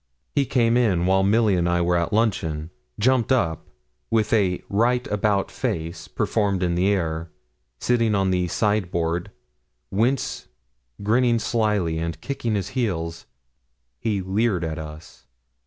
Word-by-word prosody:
He 140 Hz, -2 st, +1 dB
came 120 Hz, -2 st, +3 dB
in 95 Hz, -8 st, +2 dB
while 95 Hz, +1 st, +3 dB
Milly 105 Hz, +2 st, +3 dB
and 85 Hz, -1 st, +1 dB
I 85 Hz, 0 st, +2 dB
were 90 Hz, +1 st, +2 dB
at 85 Hz, -1 st, 0 dB
luncheon, 85 Hz, -8 st, 0 dB, 0.3 s
jumped 130 Hz, +2 st, +2 dB
up, 80 Hz, -, +1 dB, 0.4 s
with 110 Hz, -1 st, +1 dB
a 95 Hz, -5 st, +2 dB
'right 120 Hz, +5 st, +1 dB
about 105 Hz, -1 st, +1 dB
face' 85 Hz, +1 st, -3 dB
performed 100 Hz, -4 st, 0 dB
in 85 Hz, -1 st, +1 dB
the 90 Hz, +2 st, +2 dB
air, 85 Hz, -4 st, -1 dB, 0.5 s
sitting 115 Hz, -3 st, +2 dB
on 95 Hz, -1 st, +2 dB
the 90 Hz, -1 st, +1 dB
sideboard, 90 Hz, -5 st, 0 dB, 0.6 s
whence 120 Hz, +7 st, 0 dB, 0.6 s
grinning 120 Hz, +3 st, +3 dB
slyly 105 Hz, -8 st, 0 dB
and 85 Hz, 0 st, -3 dB
kicking 120 Hz, -6 st, -2 dB
his 100 Hz, -3 st, -2 dB
heels, 85 Hz, -11 st, -3 dB, 0.7 s
he 105 Hz, -4 st, -1 dB
leered 95 Hz, 0 st, 0 dB
at 80 Hz, -1 st, -3 dB
us. 75 Hz, -4 st, -10 dB
100 Hz, 140 wpm, -23 LUFS, 85-115 Hz, 0.7 s, came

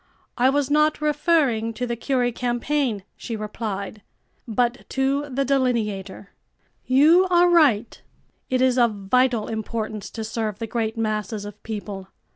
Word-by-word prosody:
"I 250 Hz, +2 st, +3 dB
was 285 Hz, 0 st, 0 dB
not 305 Hz, +1 st, +3 dB
referring 295 Hz, -7 st, +1 dB
to 250 Hz, -, -2 dB
the 240 Hz, -1 st, -2 dB
Curie 245 Hz, 0 st, 0 dB
campaign," 240 Hz, -2 st, -1 dB
she 230 Hz, -, -6 dB
replied, 210 Hz, -1 st, -5 dB, 0.5 s
"but 240 Hz, +2 st, -1 dB
to 275 Hz, +2 st, 0 dB
the 275 Hz, +1 st, -1 dB
Delineator. 215 Hz, -8 st, -1 dB, 0.6 s
You 315 Hz, +8 st, +5 dB
are 350 Hz, 0 st, +5 dB
right; 270 Hz, -10 st, +3 dB, 0.5 s
it 255 Hz, 0 st, +2 dB
is 255 Hz, -1 st, +3 dB
of 235 Hz, -3 st, +3 dB
vital 230 Hz, +3 st, +1 dB
importance 220 Hz, -1 st, -4 dB
to 225 Hz, -, -6 dB
serve 220 Hz, -2 st, -3 dB
the 230 Hz, -, -4 dB
great 225 Hz, 0 st, -2 dB
masses 215 Hz, -1 st, -2 dB
of 205 Hz, 0 st, -10 dB
people. 205 Hz, -3 st, -6 dB
235 Hz, 140 wpm, -23 LUFS, 215-270 Hz, 0.6 s, You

